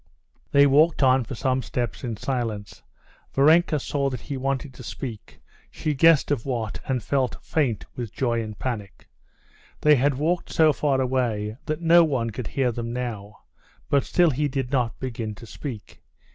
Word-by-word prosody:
They 140 Hz, 0 st, +6 dB
walked 150 Hz, +2 st, +4 dB
on 130 Hz, 0 st, +4 dB
for 130 Hz, -, -6 dB
some 130 Hz, +1 st, 0 dB
steps 120 Hz, 0 st, -4 dB
in 115 Hz, -4 st, -3 dB
silence. 110 Hz, -5 st, -4 dB, 0.5 s
Varenka 155 Hz, +2 st, +4 dB
saw 140 Hz, 0 st, -1 dB
that 125 Hz, -4 st, -5 dB
he 145 Hz, -, -5 dB
wanted 135 Hz, +1 st, -2 dB
to 125 Hz, -, -12 dB
speak; 110 Hz, 0 st, -7 dB, 0.3 s
she 155 Hz, -, -2 dB
guessed 155 Hz, +1 st, +4 dB
of 135 Hz, -6 st, 0 dB
what, 115 Hz, -5 st, -3 dB
and 130 Hz, -4 st, -1 dB
felt 135 Hz, -1 st, 0 dB
faint 135 Hz, -9 st, 0 dB
with 120 Hz, -4 st, -5 dB
joy 120 Hz, -2 st, 0 dB
and 110 Hz, -2 st, -7 dB
panic. 110 Hz, -6 st, -5 dB, 0.7 s
They 150 Hz, -1 st, +6 dB
had 140 Hz, +2 st, +2 dB
walked 165 Hz, +6 st, -1 dB
so 155 Hz, -2 st, +4 dB
far 140 Hz, -2 st, +1 dB
away 120 Hz, -5 st, -1 dB
that 155 Hz, +2 st, -2 dB
no 170 Hz, +1 st, +6 dB
one 130 Hz, -7 st, 0 dB
could 115 Hz, +1 st, -6 dB
hear 130 Hz, -3 st, 0 dB
them 115 Hz, 0 st, -4 dB
now, 110 Hz, -5 st, -5 dB, 0.5 s
but 140 Hz, -2 st, +4 dB
still 175 Hz, -3 st, +3 dB
he 145 Hz, +3 st, 0 dB
did 135 Hz, -2 st, -3 dB
not 125 Hz, -4 st, 0 dB
begin 115 Hz, -4 st, -4 dB
to 115 Hz, -, -12 dB
speak. 115 Hz, -2 st, -8 dB
130 Hz, 170 wpm, -24 LUFS, 115-145 Hz, 0.7 s, They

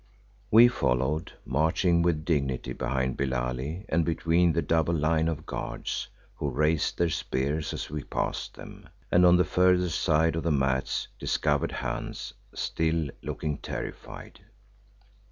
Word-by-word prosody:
We 115 Hz, +3 st, +8 dB
followed, 75 Hz, -, 0 dB
marching 80 Hz, +5 st, +2 dB
with 80 Hz, -3 st, +1 dB
dignity 70 Hz, -6 st, -1 dB
behind 65 Hz, 0 st, -1 dB
Billali 65 Hz, -, -2 dB
and 85 Hz, +1 st, +2 dB
between 85 Hz, +1 st, +2 dB
the 80 Hz, +1 st, 0 dB
double 80 Hz, +2 st, +1 dB
line 80 Hz, +1 st, +2 dB
of 80 Hz, -1 st, -3 dB
guards, -, -, -4 dB, 0.3 s
who 75 Hz, -, -2 dB
raised 75 Hz, +3 st, +1 dB
their 85 Hz, -1 st, +1 dB
spears 75 Hz, +3 st, -1 dB
as -, -, -5 dB
we 75 Hz, -2 st, -4 dB
passed -, -, -3 dB
them, -, -, -12 dB, 0.2 s
and 90 Hz, 0 st, +6 dB
on 90 Hz, 0 st, +6 dB
the 90 Hz, -, +4 dB
further 90 Hz, 0 st, +3 dB
side 80 Hz, +1 st, +2 dB
of 80 Hz, -, -1 dB
the 85 Hz, -, -1 dB
mats 65 Hz, -2 st, 0 dB
discovered 75 Hz, -2 st, 0 dB
Hans, 60 Hz, 0 st, -4 dB, 0.2 s
still 80 Hz, -2 st, 0 dB
looking 75 Hz, -2 st, -3 dB
terrified. -, -, -7 dB
80 Hz, 135 wpm, -28 LUFS, 70-85 Hz, 0.3 s, We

